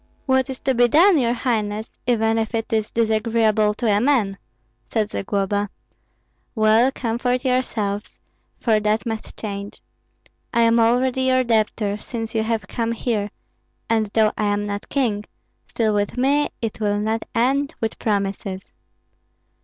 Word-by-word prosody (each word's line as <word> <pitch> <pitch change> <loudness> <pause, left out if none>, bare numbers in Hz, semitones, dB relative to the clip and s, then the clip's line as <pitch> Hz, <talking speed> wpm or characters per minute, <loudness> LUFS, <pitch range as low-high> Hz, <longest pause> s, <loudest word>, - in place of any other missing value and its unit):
"What 260 -1 +2
is 265 - -4
to 265 - +1
be 245 0 +4
done, 335 - +5
your 235 -2 +2
highness, 220 -3 -2
even 225 -2 +2
if 225 +1 -2
it 225 +1 -3
is 215 -1 +1
disagreeable 220 -1 +2
to 240 - -4
a 205 -2 +3
man?" 225 -8 +1 0.5
said 215 -1 -1
Zagloba. 200 +1 -1 0.9
"Well, 220 +3 +4
comfort 245 +1 -1
yourselves, 220 -5 -1 0.4
for 220 -3 +2
that 215 +1 0
must 225 -2 -5
change. 200 -1 -6 0.8
I 235 - +4
am 230 0 +4
already 250 +3 +2
your 255 0 +3
debtor, 215 -3 0
since 225 0 -5
you 220 - +1
have 220 0 -2
come 230 -1 -2
here; 220 -3 -1 0.6
and 220 -1 +2
though 215 +1 +2
I 210 - +1
am 205 0 0
not 205 0 -5
king, 220 -7 0 0.4
still 220 -2 0
with 205 +3 -1
me 280 +3 +2
it 225 -1 -3
will 205 -1 +1
not 220 +2 -1
end 275 +6 +1
with 225 -1 -3
promises." 195 -2 -2
225 Hz, 150 wpm, -22 LUFS, 210-245 Hz, 0.9 s, done